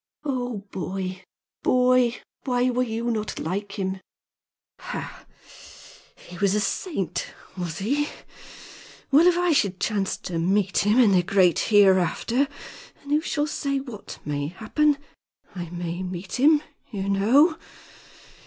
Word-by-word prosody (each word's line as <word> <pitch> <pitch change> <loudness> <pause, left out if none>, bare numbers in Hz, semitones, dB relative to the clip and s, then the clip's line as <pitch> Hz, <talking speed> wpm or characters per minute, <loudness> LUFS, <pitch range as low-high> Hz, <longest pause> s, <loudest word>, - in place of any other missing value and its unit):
"Oh, 245 -7 -3
boy! 185 +1 -4 0.4
boy! 250 -1 +3 0.3
Why 250 -1 +2
were 250 +1 0
you 235 0 -1
not 215 -2 -3
like 200 +5 -4
him?" 190 -1 -3 0.8
"Ha! - - -7 0.9
He 175 -1 -12
was 200 0 +2
a - - +2
saint, 200 - -2 0.3
was 175 -4 -4
he? 280 - 0 1.0
Well, 310 +6 +6
if 355 -1 +4
I 355 -1 +2
should 200 - +1
chance 200 -3 -1
to 170 -3 -4
meet 195 +3 +1
him 210 +3 +3
in 230 -5 +6
the 185 -2 +5
great 180 -1 +3
hereafter 205 +6 +4 0.6
and 285 - -8
who 300 +1 +3
shall 295 -2 -1
say 280 -2 -2
what 245 -7 -9
may 145 -1 -2
happen? 275 - +1 0.6
I 175 -3 -6
may 175 0 -4
meet 185 +4 -5
him, 300 +2 +5 0.3
you 195 -4 -4
know. 250 - +4
205 Hz, 135 wpm, -25 LUFS, 185-255 Hz, 1.0 s, Well